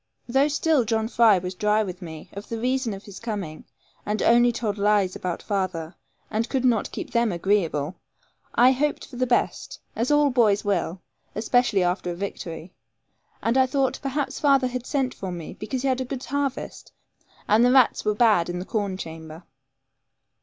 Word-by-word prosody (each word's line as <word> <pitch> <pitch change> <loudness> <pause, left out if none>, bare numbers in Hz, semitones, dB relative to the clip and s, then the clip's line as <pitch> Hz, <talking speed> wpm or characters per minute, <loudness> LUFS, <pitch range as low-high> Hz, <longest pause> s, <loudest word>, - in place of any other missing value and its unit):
Though 270 +4 +3
still 300 -1 +2
John 220 0 0
Fry 225 -4 +5
was 180 +1 -4
dry 210 +3 +2
with 185 -1 -7
me 160 -3 -9
of 200 +1 -9
the 230 - -3
reason 255 0 0
of 195 - -11
his 200 -2 -10
coming, 200 -9 -5 0.4
and 210 +1 -2
only 240 +1 +5
told 215 -3 -3
lies 200 -2 +2
about 180 -2 -4
father, 185 -5 -2 0.4
and 225 +2 -1
could 260 -2 0
not 235 -4 +2
keep - - -6
them 235 -2 +2
agreeable, 170 -4 0 0.6
I 250 +2 +6
hoped 290 +3 -1
for 250 - -11
the 255 0 0
best, 240 - -1 0.2
as 235 +2 -1
all 295 -1 +4
boys 215 -5 +3
will, 185 -2 -1 0.3
especially 220 -3 +2
after 180 0 -1
a 175 - -3
victory. 175 -2 -6 0.7
And 230 +4 +2
I 260 - +4
thought, 265 -1 0
perhaps 275 0 -2
father 275 -3 +4
had 250 0 -4
sent 270 -3 0
for 190 -2 -6
me 170 -3 -7
because 255 +4 -4
he - - +1
had 260 -1 +1
a - - -2
good 260 0 -5
harvest, 280 0 -3 0.6
and 215 +3 +5
the 245 - +5
rats 260 -2 +4
were 210 -1 +1
bad 210 -7 +3
in 175 - -3
the 180 - -5
corn 205 -4 -2
chamber. 160 -1 -8
220 Hz, 185 wpm, -24 LUFS, 185-255 Hz, 0.7 s, I